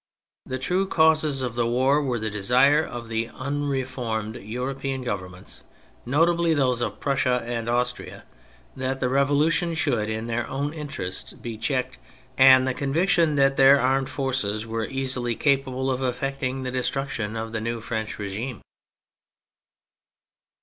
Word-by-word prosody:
The 130 - -3
true 180 +9 0
causes 155 -5 +3
of 125 -2 -2
the 120 0 0
war 130 +5 +3
were 130 -4 -1
the 110 -1 -3
desire 125 +9 +4
of 120 -5 -7
the 115 0 -2
unre 140 +1 -2
formed 110 -4 -4
European 130 +4 -4
Governments 90 -5 -6 0.5
(notably 165 +4 +3
those 125 -4 +1
of - - -3
Prussia 130 -3 +1
and 120 -1 -3
Austria) 125 +1 -2 0.5
that 130 0 -2
the 125 - 0
Revolution 145 +6 +2
should, 125 -9 0
in 110 +1 -3
their 120 0 -2
ovv^n 145 +2 -3
interests, 140 - -5
be 115 -2 -7
checked, 125 +3 -2 0.4
and 130 0 +7
the 130 - +1
conviction 165 +4 +2
that 135 -1 +3
their 135 +1 +7
armed 135 +1 +1
forces 130 -6 -2
were 115 0 -2
easily 130 -2 -2
capable 135 -1 +1
of 130 0 -2
effecting 130 +1 -2
the 130 - -3
destruction 125 -4 -2
of 110 0 -4
the 110 -1 -3
new 115 +1 -3
French 110 -1 -4
regime. 105 +3 -5
130 Hz, 145 wpm, -25 LUFS, 115-140 Hz, 0.5 s, and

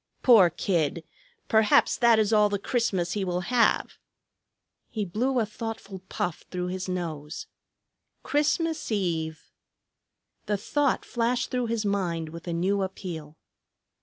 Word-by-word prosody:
Poor 220 -8 +7
kid! 170 -2 -1 0.4
Perhaps 220 -1 +4
that 235 -3 +5
is 220 0 +2
all 210 -1 +5
the 205 - 0
Christmas 195 -5 0
he 205 +1 -1
will 180 -1 -1
have." 240 +4 +1 0.9
He 215 -2 -3
blew 245 +8 0
a 230 - +2
thoughtful 220 -3 -6
puff 175 -3 -3
through 180 -1 -3
his 185 0 -4
nose. 160 -4 -4 0.8
"Christmas 310 +1 0
Eve!" 160 -6 -2 1.0
The 205 0 +1
thought 280 +6 0
flashed 240 +1 -1
through 250 -2 0
his 225 -1 -1
mind 175 -5 -1
with 165 +2 -10
a - - -2
new 190 +4 +1
appeal. 170 -5 -6
200 Hz, 135 wpm, -27 LUFS, 175-230 Hz, 1.0 s, Poor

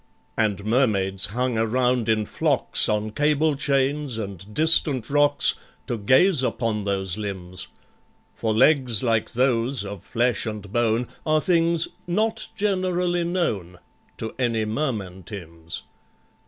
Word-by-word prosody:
And 105 -3 -1
Mermaids 100 -6 +1
hung 125 +2 -1
around 125 +1 +1
in 110 -1 +2
flocks, - - +1
On 105 0 -1
cable 150 +3 +1
chains 140 -1 0
and 100 -2 -7
distant 145 -2 +4
rocks, 145 0 +4 0.3
To 120 - -2
gaze 130 - +4
upon 115 -5 -1
those 95 -1 -1
limbs; 95 -3 -4 0.7
For 110 - -2
legs 125 -1 +3
like 115 -1 0
those, 125 -2 +1
of 100 -2 -8
flesh 120 -1 0
and 105 -2 -6
bone, 120 0 +1 0.2
Are 155 -1 +2
things 170 0 +2 0.2
"not 220 +5 0
generally 185 -4 0
known" 110 - -2 0.4
To 110 - -5
any 115 -3 0
Merman 110 -7 -3
TIMBS. 85 -4 -7
120 Hz, 125 wpm, -23 LUFS, 105-145 Hz, 0.7 s, distant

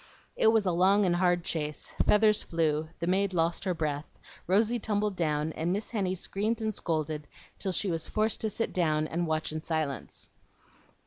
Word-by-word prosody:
It - - +3
was 220 -2 +4
a 185 - +2
long 190 +4 +4
and 175 -1 +2
hard 175 -1 +2
chase; 150 -3 -3
feathers 210 0 +5
flew, 155 -2 0
the 170 - -2
maid 190 +1 +1
lost 165 +3 +1
her 185 -2 0
breath, 150 -2 -2 0.4
Rosy 220 +6 +3
tumbled 210 -1 -1
down, 155 -2 0
and 165 +2 -1
Miss 205 +3 -2
Henny 190 -5 0
screamed 210 +5 -1
and 220 -1 -1
scolded 155 -4 -2 0.3
till 190 - -1
she 185 +1 0
was 165 -1 -2
forced 215 0 0
to 220 - 0
sit 230 - -2
down 155 -4 +1
and 170 +2 -2
watch 155 0 -1
in 155 0 -4
silence. 155 -6 -4
175 Hz, 185 wpm, -29 LUFS, 160-205 Hz, 0.4 s, feathers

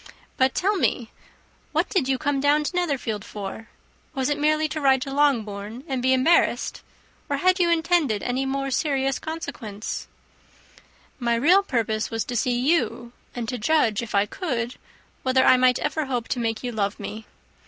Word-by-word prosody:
But 260 0 +2
tell 400 +2 +1
me, 240 -9 0 0.6
what - - +1
did 345 -10 0
you 265 - +2
come 285 0 0
down 290 +2 +3
to 325 - -4
Netherfield 275 - -1
for? 205 +2 -7 0.5
Was 265 0 0
it 290 - -1
merely 310 +1 +2
to 310 - -4
ride 265 -1 +4
to 275 -2 -6
Longbourn 230 -5 0
and 265 -4 -2
be 260 +1 +2
embarrassed? 260 +6 +2 0.5
or 285 - 0
had 370 +4 +3
you 345 -1 +3
intended 325 - +2
any 255 +2 -1
more 275 0 -2
serious 270 -2 0
consequences?" 270 -10 -6 1.1
"My 235 -2 +1
real 340 +12 +5
purpose 225 - -1
was 225 -1 -2
to 245 - -5
see 245 +1 +1
you, 240 -4 0 0.2
and 240 -2 -4
to 250 -1 -3
judge, 230 -4 +2
if 230 -3 -5
I 200 0 +4
could, 245 - -3 0.5
whether 260 0 +3
I - - +7
might 255 0 +4
ever 310 -3 -2
hope 245 -3 -2
to 250 - -1
make 225 -1 -2
you 245 - -2
love 205 -3 -2
me. 220 +1 -7
260 Hz, 175 wpm, -24 LUFS, 230-295 Hz, 1.1 s, I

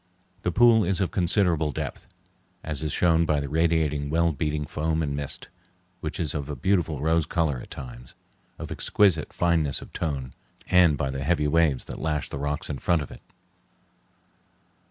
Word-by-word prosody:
The 90 - -1
pool 115 +2 +5
is 95 +1 0
of 95 - 0
considerable 85 -4 +2
depth, - - -6 0.6
as 75 -2 -3
is 75 -2 -2
shown 85 0 +3
by 75 -1 +2
the 70 - -3
radiating 80 -2 +1
well 85 +2 +2
beaten 75 0 -2
foam 80 +2 -1
and 70 -2 -2
mist, 70 -1 0 0.5
which 75 -1 -5
is 80 -5 0
of 75 -2 -4
a 75 - -3
beautiful 80 -1 0
rose 80 0 +1
color 80 -7 0
at - - -11
times, - - -10 0.4
of - - -7
exquisite 95 -7 +2
fineness 80 -5 +1
of - - -13
tone, 70 -6 -3 0.3
and 90 -5 +4
by 70 -1 -1
the 70 0 -4
heavy 75 0 +1
waves 75 -3 +2
that - - -8
lash 75 -3 -1
the 70 - -5
rocks 75 +2 -3
in 70 -4 -4
front 85 +1 +1
of - - -10
it. - - -12
80 Hz, 175 wpm, -26 LUFS, 70-85 Hz, 0.6 s, pool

